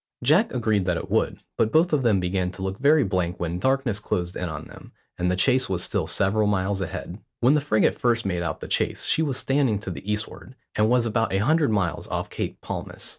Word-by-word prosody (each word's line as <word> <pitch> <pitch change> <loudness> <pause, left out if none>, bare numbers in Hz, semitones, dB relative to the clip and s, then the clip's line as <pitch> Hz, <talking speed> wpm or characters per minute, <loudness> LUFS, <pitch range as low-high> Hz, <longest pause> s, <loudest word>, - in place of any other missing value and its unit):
Jack 170 - +4
agreed 110 -6 0
that 90 -2 +1
it - - -6
would, - - +1 0.2
but 110 - +2
both 165 +2 +3
of 150 - +3
them 110 -6 +3
began 90 0 -1
to 95 +1 -8
look 95 +1 -3
very 145 +2 +5
blank 90 -3 -1
when 85 0 -2
darkness 130 -3 +1
closed 90 -3 -3
in 90 - -3
on 75 -2 -6
them, - - -13 0.3
and 90 +1 +1
the 90 - +1
chase 125 +6 +2
was 90 -2 -1
still - - -1
several 105 +2 +1
miles 100 -1 0
ahead. 90 +2 -5 0.2
When 125 +4 +4
the 150 - +2
frigate 125 -7 +1
first 120 -3 +1
made 90 -3 -1
out 85 - -3
the - - -6
chase - - 0
she - - +2
was 140 -5 0
standing 135 -6 +1
to 95 - -5
the 100 +4 -5
eastward, 105 +4 -5 0.2
and 105 +1 +2
was 125 -1 +3
about 115 0 0
a - - +2
hundred 150 +8 +2
miles 95 -7 -1
off - - -4
Cape - - -4
Palmas. - - -6
105 Hz, 230 wpm, -24 LUFS, 95-130 Hz, 0.3 s, very